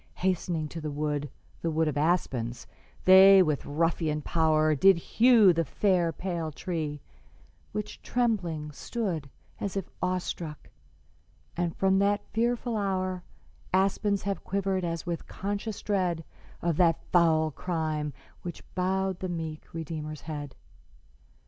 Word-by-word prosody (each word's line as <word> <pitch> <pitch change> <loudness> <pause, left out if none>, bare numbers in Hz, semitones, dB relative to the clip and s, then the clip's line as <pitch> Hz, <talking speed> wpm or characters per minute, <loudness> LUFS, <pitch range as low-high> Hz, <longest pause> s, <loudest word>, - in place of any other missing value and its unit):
Hastening 175 -4 -1
to 165 - -6
the 155 - -3
wood 145 0 -2 0.3
The 165 - 0
wood 160 0 +1
of 150 - -1
aspens 140 -7 0 0.4
they 190 +1 +9
with 150 -4 -1
ruffian 155 0 0
power 155 -1 +3
Did 190 +6 +6
hew 220 +1 +5
the 165 0 +1
fair, 175 - +1
pale 170 -1 -3
tree, 150 -3 -4 0.7
which 210 0 -5
trembling 175 -11 -1
stood 170 - -3 0.3
As 200 -1 -3
if 190 - -3
awestruck; 180 -4 -3 0.8
and 175 -1 -1
from 190 0 +3
that 205 +1 +1
fearful 235 +1 0
hour 185 -2 -1 0.5
Aspens 195 +1 +2
have 200 -1 -2
quivered 195 -1 -1
as 165 -1 -3
with 170 -2 -4
conscious 205 +2 -4
dread 180 -5 0 0.4
Of 170 -3 +1
that 165 -2 +3
foul 160 -3 +4
crime 155 -2 -2 0.3
which 175 -2 -7
bowed 190 0 0
the 185 - -3
meek 160 -3 -5
Redeemer's 155 -2 -5
head. 145 -3 -6
170 Hz, 130 wpm, -28 LUFS, 155-190 Hz, 0.8 s, they